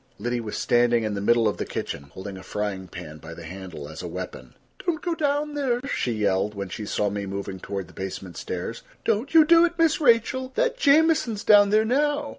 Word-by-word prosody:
Liddy 120 +3 -2
was 110 -2 -5
standing 120 -1 +3
in 110 -1 -1
the 100 - -3
middle 115 +2 +3
of 105 - -1
the - - -2
kitchen, 70 - -5
holding 95 +7 -8
a 95 - -9
frying 100 -2 -4
pan 80 -4 -9
by 80 +2 -10
the 85 - -10
handle 90 -3 -8
as 80 +1 -8
a 90 - -5
weapon. 90 +2 -7 0.3
"Don't 345 -4 0
go 345 +2 -2
down 295 -1 0
there," 265 -5 0
she 125 - -1
yelled, 105 -1 0
when 100 -1 -5
she 105 +3 -6
saw 105 0 0
me 100 -1 -4
moving 95 -1 -5
toward 95 -1 -5
the - - -17
basement 95 -2 -6
stairs. 90 +6 -5 0.2
"Don't 230 +8 0
you 315 -1 +9
do 335 +1 +7
it, 345 0 +1
Miss 330 -1 +3
Rachel. 260 +1 +2
That - - +1
Jamieson's 285 - +3
down 205 -2 +6
there 215 +1 +4
now. 290 +4 +1
115 Hz, 220 wpm, -25 LUFS, -, 0.3 s, you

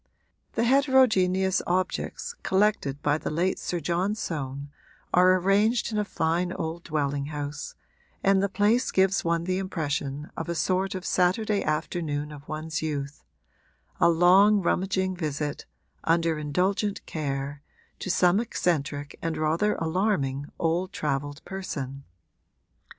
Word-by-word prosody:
The 230 - +1
heterogeneous 230 -9 +3
objects 185 - -1
collected 190 -8 +1
by 150 +1 +2
the - - -3
late 175 +4 0
Sir 175 - -2
John 175 +6 0
Soane 140 -7 -4 0.4
are 185 +1 +6
arranged 205 +6 +2
in 215 - 0
a - - +2
fine 175 -1 0
old 165 +2 -4
dwelling 145 -2 -1
house, 145 -1 -5 0.5
and 195 0 +4
the 200 - +1
place 210 +5 +2
gives 190 0 +2
one 170 0 +1
the 185 +1 -1
impression 150 -6 -3
of 165 - -5
a 170 - -1
sort 190 +3 0
of 185 -1 -5
Saturday 200 +3 +1
afternoon 150 -1 -2
of 145 -1 -11
one's 155 0 -4
youth 145 -2 -4 0.8
a - - +5
long, 185 +5 +6
rummaging 185 +1 0
visit, 150 -3 -3 0.4
under 165 -1 +2
indulgent 185 +7 0
care, 140 -2 -3 0.4
to - - -5
some 180 +2 +4
eccentric 145 -10 -2
and 165 -1 -2
rather 165 +7 +1
alarming 160 -6 0
old 175 +3 0
travelled 145 -4 -3
person. 140 -8 -5
170 Hz, 130 wpm, -26 LUFS, 150-190 Hz, 0.8 s, are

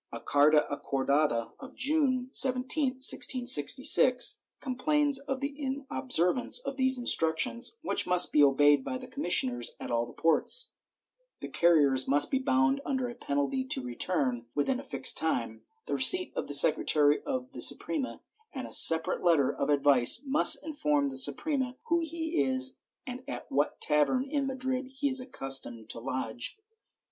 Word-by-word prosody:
A - - -8
carta 150 +1 +1
acordada 140 -3 -3
of 265 -2 -14
June 260 -2 -1
17, 255 +3 +2
1666, 250 - +3 0.2
complains 285 +2 -1
of 270 -1 -7
the 280 +1 -5
inobservance 255 - -2
of - - -6
these 260 -1 +1
instructions, 235 - -1
which - - -4
must 180 0 +3
be 150 - +3
obeyed 145 0 +2
by 255 - -6
the 255 - -12
commissioners 135 - -2
at - - -9
all 120 0 -2
the - - -15
ports; 455 - +2 0.7
the - - -8
carriers 145 -6 +1
must 145 +2 +2
be 265 - -1
bound 270 +1 -1
under 260 -2 -4
a - - -9
penalty 145 - -4
to 260 - -1
return, 125 -2 -4
within 255 - -2
a - - -10
fixed - - -1
time, - - -4 0.2
the - - -6
receipt 365 -1 +5
of - - -5
the 145 - +3
secretary 145 0 +4
of 260 -2 -6
the - - -8
Suprema, 290 -5 -1 0.3
and 265 -3 -7
a - - -15
separate 165 0 +6
letter 165 -6 0
of 140 - -5
advice 140 - +2
must 285 +1 +4
inform 150 - -2
the 135 - -10
Suprema 255 - 0
who 340 +1 +1
he 325 0 -4
is 260 0 -2 0.3
and 255 0 -9
at 285 - -8
what 145 +2 -2
tavern 150 - 0
in 280 -1 -4
Madrid 260 0 -5
he 270 +2 -4
is 260 0 +1
accustomed 135 - -5
to - - -7
lodge. 120 - -6
250 Hz, 155 wpm, -27 LUFS, -, 0.7 s, separate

